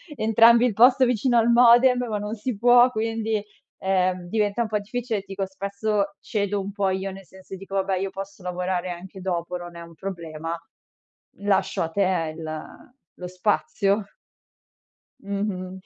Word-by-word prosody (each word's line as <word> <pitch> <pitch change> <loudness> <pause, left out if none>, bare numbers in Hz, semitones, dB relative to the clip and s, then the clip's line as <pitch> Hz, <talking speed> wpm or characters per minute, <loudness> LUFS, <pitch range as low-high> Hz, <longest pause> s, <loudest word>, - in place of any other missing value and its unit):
entrambi 230 +1 +5
il 245 - +1
posto 250 +5 +6
vicino 245 0 +2
al 230 0 +4
modem, 245 +1 +6
ma 215 - -1
non 210 +1 -4
si 225 0 -4
può, 245 +2 +6
quindi 225 -1 -2 0.4
ehm 185 -2 0
diventa 210 +2 0
un - - -4
po' 210 -1 0
difficile. 225 0 -3
Dico 195 0 -4
spesso 200 +1 -2
cedo 205 -1 -2
un 195 +1 -6
po' 200 -1 0
io, 190 +1 -2
nel 195 0 -11
senso 190 +1 -11
dico 195 +1 -8
vabbè 190 -1 0
io 195 +1 -2
posso 195 0 -8
lavorare 180 0 -2
anche 185 +2 -9
dopo, 180 -1 -2
non 175 -1 -10
è 170 - -8
un 170 0 -12
problema, 165 -3 -5 0.8
lascio 200 -1 0
a 165 - -3
te 175 -3 0
il 155 -1 -5 0.5
lo 180 - -6
spazio. 200 +2 0 1.2
Mh-mh. 190 -2 -4
195 Hz, 160 wpm, -24 LUFS, 185-220 Hz, 1.2 s, posto